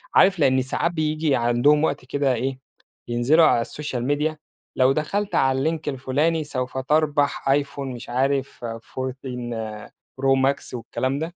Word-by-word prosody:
عارف 190 Hz, -2 st, +5 dB
لإن 130 Hz, -2 st, +4 dB
ساعات 135 Hz, +6 st, -1 dB
بييجي 155 Hz, -2 st, 0 dB
عندهم 120 Hz, +6 st, +3 dB
وقت 145 Hz, -4 st, -1 dB
كده 140 Hz, 0 st, +1 dB
إيه، 130 Hz, +2 st, -2 dB, 0.5 s
ينزلوا 125 Hz, +8 st, +4 dB
على 115 Hz, -5 st, +3 dB
الSocial 150 Hz, -5 st, -5 dB
media، 150 Hz, +2 st, 0 dB, 0.4 s
لو 130 Hz, +1 st, +4 dB
دخلت 195 Hz, +8 st, -1 dB
على 135 Hz, +4 st, +2 dB
الLink 160 Hz, -, -3 dB
الفلاني 145 Hz, +4 st, 0 dB
سوف 130 Hz, -2 st, -4 dB
تربح 145 Hz, 0 st, +1 dB
iphone 140 Hz, 0 st, -8 dB, 0.2 s
مش 120 Hz, 0 st, -10 dB
عارف 135 Hz, +1 st, -1 dB
14 120 Hz, -2 st, -6 dB, 0.3 s
Pro -, -, -2 dB, 0.2 s
Max 140 Hz, -1 st, 0 dB
والكلام 130 Hz, +3 st, -2 dB
ده، 165 Hz, +3 st, -5 dB
135 Hz, 145 wpm, -23 LUFS, 125-150 Hz, 0.5 s, عارف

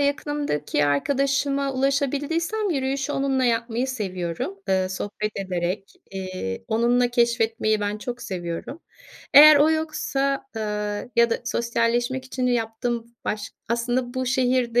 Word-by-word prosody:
yakınımdaki 285 Hz, -, 0 dB
arkadaşıma 275 Hz, -, +1 dB
ulaşabildiysem 290 Hz, +9 st, 0 dB
yürüyüşü 275 Hz, -1 st, -1 dB
onunla 270 Hz, -2 st, +1 dB
yapmayı 235 Hz, +1 st, 0 dB
seviyorum, 185 Hz, -6 st, -4 dB
ııı, 190 Hz, -1 st, +2 dB
sohbet 205 Hz, +2 st, -3 dB
ederek, 185 Hz, 0 st, -3 dB, 0.2 s
eee, 185 Hz, -, -5 dB
onunla 240 Hz, +2 st, +3 dB
keşfetmeyi 230 Hz, -2 st, +1 dB
ben 205 Hz, +1 st, -2 dB
çok 240 Hz, +3 st, -6 dB
seviyorum. 175 Hz, -, -5 dB, 0.5 s
Eğer 300 Hz, +1 st, +11 dB
o 295 Hz, +2 st, +5 dB
yoksa, 295 Hz, -3 st, -1 dB
aaa 210 Hz, -1 st, -2 dB
ya 235 Hz, 0 st, +5 dB
da -, -, +1 dB
sosyalleşmek 235 Hz, +2 st, 0 dB
için 255 Hz, -1 st, -2 dB
yaptığım 235 Hz, 0 st, -2 dB
baş 210 Hz, -1 st, -3 dB, 0.2 s
Aslında 245 Hz, +2 st, -1 dB
bu 255 Hz, 0 st, -1 dB
şehirde 250 Hz, -2 st, +2 dB
240 Hz, 120 wpm, -24 LUFS, 210-275 Hz, 0.5 s, Eğer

